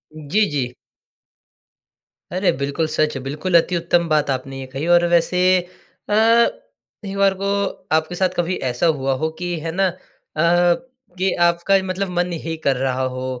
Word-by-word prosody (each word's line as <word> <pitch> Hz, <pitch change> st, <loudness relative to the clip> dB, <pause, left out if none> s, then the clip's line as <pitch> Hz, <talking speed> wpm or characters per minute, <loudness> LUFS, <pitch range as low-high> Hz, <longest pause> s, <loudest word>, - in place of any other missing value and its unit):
जी, 155 Hz, +8 st, +1 dB
जी। 130 Hz, -4 st, -2 dB, 1.6 s
अरे, 185 Hz, +2 st, +2 dB
बिल्कुल 140 Hz, +3 st, -1 dB
सच 155 Hz, -1 st, 0 dB
है। -, -, -3 dB
बिल्कुल, 150 Hz, +6 st, -2 dB
अति 180 Hz, -, -4 dB
उत्तम 170 Hz, 0 st, +1 dB
बात 150 Hz, -1 st, +2 dB
आपने 135 Hz, 0 st, -3 dB
ये 135 Hz, -, -6 dB
कही। 135 Hz, +4 st, -3 dB
और 175 Hz, 0 st, +5 dB
वैसे 175 Hz, +1 st, +2 dB, 0.7 s
अ, -, -, 0 dB, 0.9 s
एक 195 Hz, 0 st, -5 dB
बार 195 Hz, -1 st, +4 dB
को 200 Hz, -, -1 dB, 0.5 s
आपके 160 Hz, +3 st, 0 dB
साथ 185 Hz, +1 st, +1 dB
कभी 175 Hz, +1 st, 0 dB
ऐसा 125 Hz, +7 st, -1 dB
हुआ 135 Hz, 0 st, 0 dB
हो 160 Hz, -, +1 dB
कि 175 Hz, -1 st, -2 dB
है 165 Hz, +1 st, -4 dB
ना 190 Hz, +3 st, +1 dB
अ, 180 Hz, -, -3 dB, 0.4 s
कि 180 Hz, +4 st, +1 dB, 0.2 s
आपका 170 Hz, +3 st, +2 dB
मतलब 190 Hz, +1 st, -3 dB
मन 175 Hz, 0 st, 0 dB
ही 165 Hz, 0 st, -2 dB
कर 140 Hz, -, +3 dB
रहा 130 Hz, 0 st, -1 dB
हो 130 Hz, 0 st, -4 dB
170 Hz, 165 wpm, -20 LUFS, 145-185 Hz, 1.6 s, और